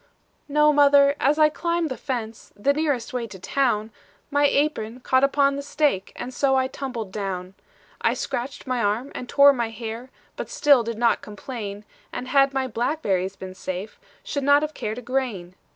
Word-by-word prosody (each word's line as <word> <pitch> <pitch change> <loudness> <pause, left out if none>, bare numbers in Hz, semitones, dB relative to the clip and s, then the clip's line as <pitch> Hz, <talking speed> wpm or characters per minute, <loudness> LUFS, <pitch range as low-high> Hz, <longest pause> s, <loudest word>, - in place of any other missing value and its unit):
"No, 300 +1 +4
mother, 285 -1 +6
as 285 +3 +2
I 305 -1 +6
climbed 335 +1 -1
the 260 - -3
fence, 230 -5 -5
The 240 +8 +2
nearest 290 -4 -1
way 240 -2 -2
to 200 - -10
town, 220 +1 0 0.4
My 285 0 +4
apron 255 -6 0
caught 260 +1 +2
upon 275 0 +3
the - - -3
stake, 285 -8 0
And 255 - -6
so 270 +1 +2
I 260 0 +3
tumbled 255 -6 -5
down. 190 -2 -4 0.5
"I - - +2
scratched 250 +2 -4
my 255 -2 -1
arm 220 +6 -1
and 250 - -7
tore 280 0 +7
my 235 -3 -2
hair, 225 +2 -7 0.3
But - - -5
still 295 - +4
did 230 -1 -4
not 235 0 +2
complain; 210 -1 -7 0.3
And 255 - -6
had 275 0 +4
my 270 -1 -1
blackberries 215 - -1
been 190 -1 -8
safe, 185 +2 -6 0.2
Should 285 - -3
not 285 +2 +5
have 305 0 -3
cared 215 -4 -4
a 250 - -7
grain. 230 -9 -2
255 Hz, 185 wpm, -24 LUFS, 220-280 Hz, 0.5 s, tore